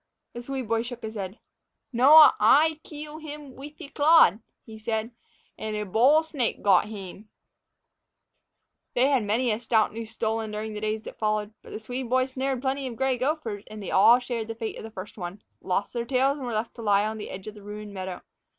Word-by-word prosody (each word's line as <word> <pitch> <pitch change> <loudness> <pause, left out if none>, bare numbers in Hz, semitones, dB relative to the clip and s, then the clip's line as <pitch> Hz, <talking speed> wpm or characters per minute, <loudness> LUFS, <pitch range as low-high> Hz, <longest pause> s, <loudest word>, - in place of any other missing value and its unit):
The 240 - -6
Swede 260 -1 -5
boy 225 +1 +1
shook 240 0 -7
his 220 0 -5
head. 195 0 -6 0.6
"Noa; 295 +6 +8
ay 300 +8 +5
keel 300 0 -9
hame 295 -3 -9
weeth 295 +3 -11
a - - -7
clode," 295 - +5 0.3
he 220 -1 -11
said, 220 +1 -2 0.5
"an' 215 0 -4
a 210 0 -3
bole 255 - +4
snake 285 -7 -2
gote 200 0 +5
hame." 205 0 -9 1.7
They 255 +3 +4
had 270 -4 +3
many 230 +4 +1
a 215 - -1
stout 225 -3 +1
noose 225 0 -6
stolen 225 -1 -2
during 215 +1 -5
the 210 - -6
days 215 0 -2
that - - -10
followed. 215 0 -1
But - - -14
the - - -6
Swede 245 +2 -5
boy 255 +1 +3
snared 260 0 -3
plenty 270 0 -1
of 240 - -6
gray 265 +1 +1
gophers, 250 -6 -2
and 215 0 -9
they 200 - -6
all 230 +5 +7
shared 245 -3 -4
the 225 - -5
fate 225 -1 -5
of - - -9
the 225 - -7
first 205 0 -9
one, 180 +3 -7 0.2
lost 190 +2 -2
their 235 -1 -2
tails 270 +3 +1
and 260 - -5
were 240 - -3
left 220 +1 -2
to - - -7
lie 205 -1 +3
on 220 0 -4
the 210 - -7
edge 185 0 -8
of 215 - -7
the 210 - -13
ruined 210 0 -8
meadow. 185 -2 -6
225 Hz, 215 wpm, -26 LUFS, 210-265 Hz, 1.7 s, Noa